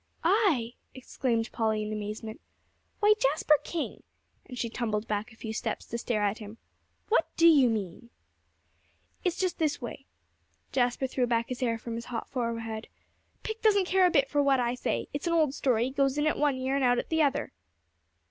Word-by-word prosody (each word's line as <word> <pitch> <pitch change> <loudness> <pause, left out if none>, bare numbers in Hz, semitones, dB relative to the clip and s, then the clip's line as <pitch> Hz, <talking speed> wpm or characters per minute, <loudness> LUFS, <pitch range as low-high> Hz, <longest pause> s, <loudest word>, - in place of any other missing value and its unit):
"I!" 330 - +2 0.2
exclaimed 245 -3 -2
Polly 220 -2 0
in 210 0 -4
amazement. 215 +1 -6 0.6
"Why, 420 +1 +6
Jasper 295 +2 +3
King!" 335 -3 -4 0.5
and 250 - -8
she 235 - -1
tumbled 225 -2 -2
back 210 +3 -2
a - - -15
few 220 -1 -6
steps - - -3
to 235 - -4
stare 225 -3 -1
at 205 +2 0
him. 215 +1 -9 0.5
"What 455 - +3
do 335 - +6
you 285 -7 +6
mean?" 215 +1 -4 1.1
"It's 360 -2 0
just 370 -2 -1
this 310 -2 +1
way." - - -8 0.6
Jasper 245 +1 +1
threw 255 -1 0
back 230 -1 0
his 255 - -4
hair 235 -3 0
from 230 +1 -7
his 230 0 -5
hot 240 -2 -5
forehead. 230 -3 -3 0.6
"Pick 440 0 -5
doesn't 405 -3 +4
care 370 0 +4
a - - +2
bit 280 -5 +3
for 290 +1 +1
what 275 -2 +3
I 240 0 +1
say: 250 - -2
it's 285 +4 -3
an 335 - +1
old 310 -5 +3
story; 250 -3 +1
goes 275 0 +1
in 295 - +1
at 310 - +2
one 290 -2 +2
ear, 260 +1 -1
and 275 - +1
out 245 -1 +4
at - - -3
the 320 0 +2
other." 280 -3 +1
250 Hz, 195 wpm, -29 LUFS, 230-295 Hz, 1.1 s, Why